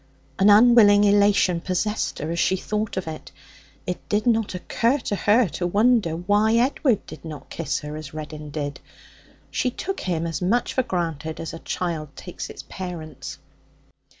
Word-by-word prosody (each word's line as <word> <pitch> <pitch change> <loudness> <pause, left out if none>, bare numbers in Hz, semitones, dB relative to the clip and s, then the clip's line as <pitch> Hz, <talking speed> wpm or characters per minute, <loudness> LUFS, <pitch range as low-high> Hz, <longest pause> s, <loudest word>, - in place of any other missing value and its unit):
An 195 +2 +6
unwilling 210 -1 +7
elation 200 -4 +4
possessed 195 +4 -1
her 155 +2 -4
as 170 - -2
she 190 - +3
thought 210 +1 -3
of 190 - -2
it. 155 -1 -7 0.5
It 180 - -5
did 210 +1 +1
not 225 -5 +1
occur 230 +8 +1
to 220 -6 -3
her 215 +4 +3
to 175 +4 -2
wonder 210 -3 +3
why 205 +6 +2
Edward 245 -2 +2
did - - -11
not 155 -4 -9
kiss 165 - -2
her 150 0 -6
as 155 -2 -7
Reddin 155 -1 -7
did. 145 -1 -4 0.7
She 250 - 0
took 380 +10 -4
him 170 -3 -2
as 165 -3 -3
much 225 +7 +1
for 260 - +2
granted 165 - -3
as 165 - -5
a 165 - -7
child 160 -6 -4
takes 180 - -7
its - - -9
parents. 160 -7 -7
185 Hz, 170 wpm, -24 LUFS, 160-215 Hz, 0.7 s, unwilling